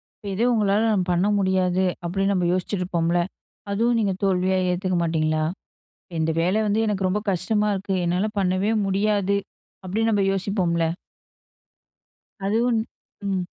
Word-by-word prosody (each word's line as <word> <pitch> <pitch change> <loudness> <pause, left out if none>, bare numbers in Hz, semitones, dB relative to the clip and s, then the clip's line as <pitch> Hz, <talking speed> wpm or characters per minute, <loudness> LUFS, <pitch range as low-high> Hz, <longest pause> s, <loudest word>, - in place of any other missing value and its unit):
இப்ப - - -19
எதுவும் 235 +5 +2
உங்களால 210 0 +2 0.2
பண்ண 180 +3 +2
முடியாது 185 -1 +1 0.2
அப்படின்னு 195 +3 0
நம்ம 180 -2 +1
யோசிச்சிட்டுருப்போம்ல 180 -2 0 0.5
அதுவும் 230 +3 +2
நீங்க 200 -3 +1
தோல்வியா 185 -1 +2
ஏத்துக்க 185 0 -1
மாட்டீங்களா? 155 -1 0 0.7
இந்த 160 0 +1
வேலை 185 +5 +2
வந்து 210 +1 +1
எனக்கு 195 -3 0
ரொம்ப 200 +3 0
கஷ்டமா 210 +4 0
இருக்கு. 195 0 -2
என்னால 180 +5 +1
பண்ணவே 190 +3 +1
முடியாது 200 0 +1 0.5
அப்படின்னு 220 +5 0
நம்ம 200 -2 +2
யோசிப்போம்ல. 185 -4 0 1.6
அதுவும் 230 +3 +2 0.5
ம். 190 -2 0
190 Hz, 125 wpm, -23 LUFS, 180-205 Hz, 1.6 s, எதுவும்